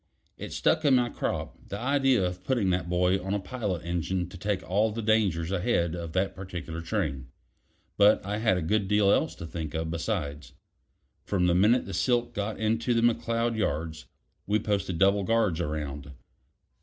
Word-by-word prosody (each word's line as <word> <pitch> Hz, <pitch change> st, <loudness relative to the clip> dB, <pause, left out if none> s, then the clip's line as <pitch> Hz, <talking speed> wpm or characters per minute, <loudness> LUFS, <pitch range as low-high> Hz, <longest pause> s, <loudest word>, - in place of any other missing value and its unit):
It -, -, -8 dB
stuck 160 Hz, -, +1 dB
in 140 Hz, -3 st, +5 dB
my 120 Hz, -1 st, +2 dB
crop -, -, -4 dB
the 100 Hz, -, -4 dB
idea 135 Hz, -3 st, +2 dB
of 90 Hz, 0 st, -4 dB
putting 105 Hz, -5 st, +1 dB
that 90 Hz, -1 st, -1 dB
boy 90 Hz, +2 st, +2 dB
on 95 Hz, +2 st, -1 dB
a -, -, 0 dB
pilot 100 Hz, -6 st, -4 dB
engine 90 Hz, +1 st, -1 dB
to -, -, -11 dB
take 95 Hz, +1 st, -3 dB
all 105 Hz, +4 st, +2 dB
the 115 Hz, +1 st, -4 dB
dangers 100 Hz, -6 st, +1 dB
ahead 90 Hz, -4 st, +1 dB
of 85 Hz, -2 st, -6 dB
that 95 Hz, +2 st, 0 dB
particular 90 Hz, -3 st, -6 dB
train; 80 Hz, -, -2 dB, 0.7 s
but 105 Hz, -1 st, +5 dB
I 105 Hz, +2 st, -2 dB
had 110 Hz, -5 st, +2 dB
a 90 Hz, -, -2 dB
good 100 Hz, +4 st, +1 dB
deal 105 Hz, 0 st, +4 dB
else -, -, +1 dB
to -, -, -8 dB
think 80 Hz, -1 st, -5 dB
of 80 Hz, 0 st, -2 dB
besides. 80 Hz, -5 st, -3 dB, 0.7 s
From 95 Hz, -3 st, 0 dB
the 90 Hz, -, +3 dB
minute 105 Hz, +8 st, +4 dB
the -, -, -7 dB
silk 120 Hz, -1 st, +1 dB
got 105 Hz, 0 st, -3 dB
into 115 Hz, +2 st, +1 dB
the 115 Hz, -, +3 dB
McCloud 115 Hz, 0 st, +1 dB
yards, 80 Hz, -7 st, -2 dB, 0.4 s
we 105 Hz, +2 st, +3 dB
posted 100 Hz, -4 st, -1 dB
double 100 Hz, +2 st, +3 dB
guards 105 Hz, -6 st, +1 dB
around. 75 Hz, -2 st, -4 dB
95 Hz, 180 wpm, -28 LUFS, 85-110 Hz, 0.7 s, in